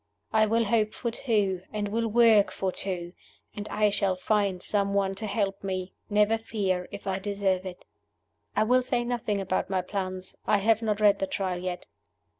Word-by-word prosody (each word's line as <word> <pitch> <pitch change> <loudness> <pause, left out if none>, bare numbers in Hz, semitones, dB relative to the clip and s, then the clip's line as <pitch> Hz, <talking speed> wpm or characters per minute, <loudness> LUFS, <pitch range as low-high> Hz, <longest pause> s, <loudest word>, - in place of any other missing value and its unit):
I 215 0 +4
will 230 +2 +2
hope 215 0 +1
for 235 - -2
two, 210 -7 0
and 210 -1 -2
will 230 +2 0
work 225 -2 +5
for 190 -1 -2
two; 180 -2 -4 0.4
and 210 -1 -6
I 210 -1 +2
shall 195 -2 +2
find 195 -1 0
some 200 -1 0
one 195 -1 +1
to 215 +3 -5
help 200 -1 -1
me 185 -1 -3 0.2
never 210 +2 +3
fear 190 -5 -1
if 200 0 -8
I 195 -1 -1
deserve 195 -2 -1
it. 180 -1 -9 0.7
"I 215 - +4
will 250 +3 +4
say 245 -1 0
nothing 235 -4 -1
about 190 -1 -1
my 185 -2 0
plans 185 -1 -4
I 210 - +4
have 220 +2 +2
not 215 -2 -1
read 205 -1 +5
the 195 - -1
Trial 185 -2 -2
yet. 180 0 -4
200 Hz, 190 wpm, -27 LUFS, 190-215 Hz, 0.7 s, work